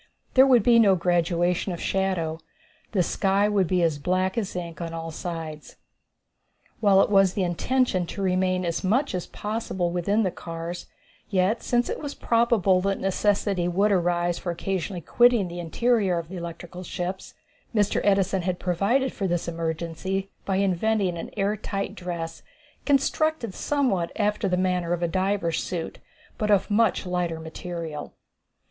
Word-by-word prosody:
There 265 +1 +7
would 245 -5 +5
be 235 0 +6
no 200 -4 +6
graduation 175 +1 +1
of 170 - -5
shadow. 180 -5 -1 0.5
The 190 -5 +2
sky 195 +4 +2
would 200 -4 +2
be 180 0 +2
as 160 -3 +1
black 185 +4 0
as 210 -6 -3
ink 170 -2 -5
on 165 -1 -4
all 165 0 -5
sides. 160 -2 -6 1.0
While 200 -3 +5
it - - -2
was 195 -2 +4
the 195 - +1
intention 185 +1 +1
to 200 - -6
remain 185 -1 +1
as 170 +2 -2
much 235 +8 +1
as 180 -1 -3
possible 205 -5 -3
within 200 +5 +1
the 185 - 0
cars, 170 +1 -6 0.4
yet 195 +3 +1
since 240 0 +1
it - - -3
was 290 -1 -5
probable 230 -6 +3
that 195 +1 0
necessity 195 -1 +1
would 195 +4 +2
arise 175 -2 +1
for 175 - -3
occasionally 185 +1 -3
quitting 240 +2 +4
the 175 0 -7
interior 195 +2 +1
of 165 -1 -5
the 185 - -6
electrical 170 +1 -7
ships, 180 +1 -5 0.4
Mr. 205 -2 +2
Edison 195 -1 +2
had 180 0 -1
provided 200 +10 +1
for 195 - -2
this 175 -1 -1
emergency 170 +4 -3
by 195 - 0
inventing 195 0 +1
an 165 - -6
air 200 +1 +1
tight 200 -1 -4
dress 170 -4 -5 0.5
constructed 285 -4 +1
somewhat 245 -13 0
after 210 -1 0
the 180 - +1
manner 180 -2 0
of 175 0 -2
a - - +2
diver's 185 -1 0
suit, 170 -3 -5 0.4
but 210 - 0
of 205 0 +3
much 215 -2 +2
lighter 175 -2 -1
material. 160 -1 -6
185 Hz, 160 wpm, -25 LUFS, 175-205 Hz, 1.0 s, There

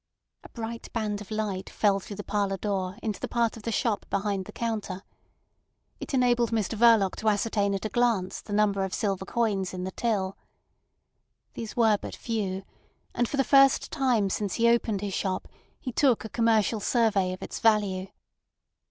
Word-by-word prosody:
A - - -12
bright 230 0 -6
band 210 -3 -2
of 210 - -10
light 210 -3 -3
fell 200 -2 +2
through 200 +1 -8
the 205 - -6
parlour 200 -1 -1
door 190 -1 -2
into 215 -3 -2
the - - -3
part 235 -2 0
of 225 - -10
the 230 - -3
shop 220 -1 0
behind 200 -1 -1
the - - -9
counter. 215 -5 -3 1.0
It - - -4
enabled 245 -2 +3
Mr 225 -2 -1
Verloc 225 -4 +5
to 220 - +1
ascertain 205 -1 +1
at 195 - -4
a - - -1
glance 230 -7 +1
the - - -11
number 205 -1 +2
of 190 - -2
silver 195 -2 -1
coins 200 -6 -1
in 180 - -4
the 190 - -3
till. 195 -3 -1 1.1
These 225 -2 -6
were 220 -3 +4
but - - -6
few; 195 -5 -3 0.5
and 240 -1 0
for 280 - -3
the 270 - +4
first 275 0 +5
time 245 -9 +1
since 200 -2 -2
he 235 0 +3
opened 230 -4 +2
his 200 -2 -3
shop 190 0 -2 0.3
he 255 - -5
took 245 -3 +2
a - - -6
commercial 225 -2 +2
survey 205 -4 +2
of 185 - -6
its - - -6
value. 205 -4 +2
210 Hz, 185 wpm, -27 LUFS, 195-230 Hz, 1.1 s, Verloc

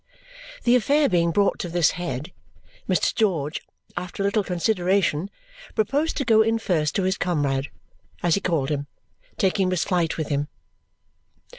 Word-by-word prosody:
The 240 0 +4
affair 285 +5 +3
being 170 -4 +2
brought 200 +4 +2
to 175 - -3
this 170 -1 +3
head, 150 -2 -5 0.6
Mr. - - +2
George, 165 -9 0 0.3
after 180 +2 -4
a - - +1
little 205 +1 +1
consideration, 180 -2 +1 0.5
proposed 280 +9 0
to 275 - -1
go 220 -2 +5
in 225 +1 +2
first 160 -9 0
to 195 - +1
his 190 0 0
comrade 145 -6 0 0.6
(as 175 -2 +3
he 200 - +1
called 160 -7 0
him), 145 -1 -2 0.5
taking 190 -1 +2
Miss 185 -3 +1
Flite 175 -4 0
with 155 - -3
him. 145 0 0
180 Hz, 155 wpm, -24 LUFS, 155-205 Hz, 0.6 s, go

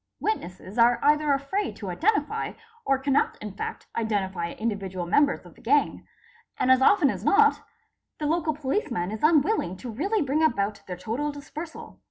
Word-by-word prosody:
Witnesses 200 - -4
are 235 +1 +5
either 300 0 +3
afraid 280 +9 -1
to 195 -4 -6
identify 405 - 0 0.3
or 270 - +3
cannot 270 +1 +1
in 210 -1 -6
fact 195 - -6
identify 190 -6 -2
individual 195 -5 -3
members 285 +11 +2
of - - -14
the - - -20
gang, - - +1 0.5
and 260 - +2
as 260 0 +5
often 290 -2 +5
as 195 -1 -7
not 430 - +4 0.6
the 300 - -3
local 315 0 0
policeman 260 - -2
is 215 - -5
unwilling 305 - +2
to 240 +4 -7
really 385 - 0
bring 285 +3 0
about 205 -8 +1
their 180 -1 -5
total 235 +11 -2
dispersal. 300 +3 -9
265 Hz, 165 wpm, -26 LUFS, 200-305 Hz, 0.6 s, are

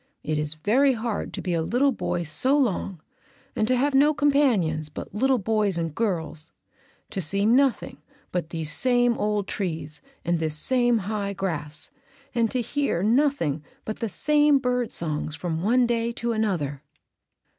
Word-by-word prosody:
It 155 0 -1
is 150 0 -2
very 255 - +3
hard 230 -2 -3
to - - -5
be 180 - -1
a 165 - +1
little 250 +11 +2
boy 175 -7 -2
so 255 - +1
long 195 - 0 0.6
and 215 - +1
to 255 - +3
have 285 +3 +1
no 290 +3 +5
companions 235 - +2
but 150 - -8
little 260 +5 +2
boys 210 -3 0
and 165 -2 -2
girls, 165 -6 -2 0.6
to 195 - -2
see 195 +5 -1
nothing 255 +3 +2 0.3
but 175 -3 -2
these 160 -2 -3
same 245 +4 +3
old 210 -1 0
trees 160 -7 -4 0.2
and 170 0 +1
this 155 -1 -1
same 245 +5 +3
high 200 -1 -2
grass, 155 -6 -3 0.4
and 230 -2 +2
to 255 - -1
hear 240 -7 -1
nothing 225 - +2 0.2
but 215 - -5
the 230 - -2
same 295 - +4
bird 250 -2 -1
songs 155 -2 -3
from 165 -1 -3
one 245 +6 +3
day 235 0 0
to 235 0 -2
another." 175 -11 -1
210 Hz, 165 wpm, -25 LUFS, 165-250 Hz, 0.6 s, no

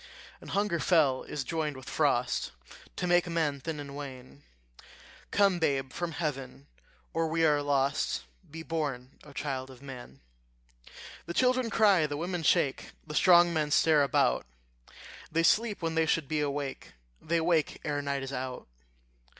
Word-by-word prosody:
And - - -11
hunger 200 -4 0
fell 150 -8 +3
is 145 - -5
joined 150 0 -2
with 130 +1 -11
frost, 135 - 0 0.4
To - - -2
make 175 0 +3
men 160 -4 0
thin 155 +2 -5
and 140 -1 -8
wan: 135 -1 -9 0.9
Come, 195 -3 +3
babe, 135 -5 0
from 175 -2 -3
heaven, 135 - -4 0.5
or 165 0 +1
we 165 +1 +1
are 150 -2 +3
lost; 140 - 0 0.3
Be 160 +2 -8
born, 140 -6 -3
O 150 - -13
child 135 -2 -4
of 130 0 -14
man. 120 - -10 1.1
The 170 - -5
children 255 -1 +2
cry, 200 -9 +4
the 145 -1 -4
women 175 +2 -3
shake, 140 -3 +1
The 150 - -8
strong 175 +1 +6
men 155 -2 0
stare 155 0 +4
about; 140 - +2 0.8
They 165 +1 +1
sleep 210 +1 +2
when 165 0 -1
they 160 0 +2
should 160 -4 +1
be 155 +2 -1
awake, 140 -1 -4 0.3
They 165 +2 0
wake 165 -2 +1
ere 145 -1 -1
night 140 -1 -2
is 135 0 -6
out. 130 0 -5
150 Hz, 160 wpm, -29 LUFS, 135-165 Hz, 1.1 s, strong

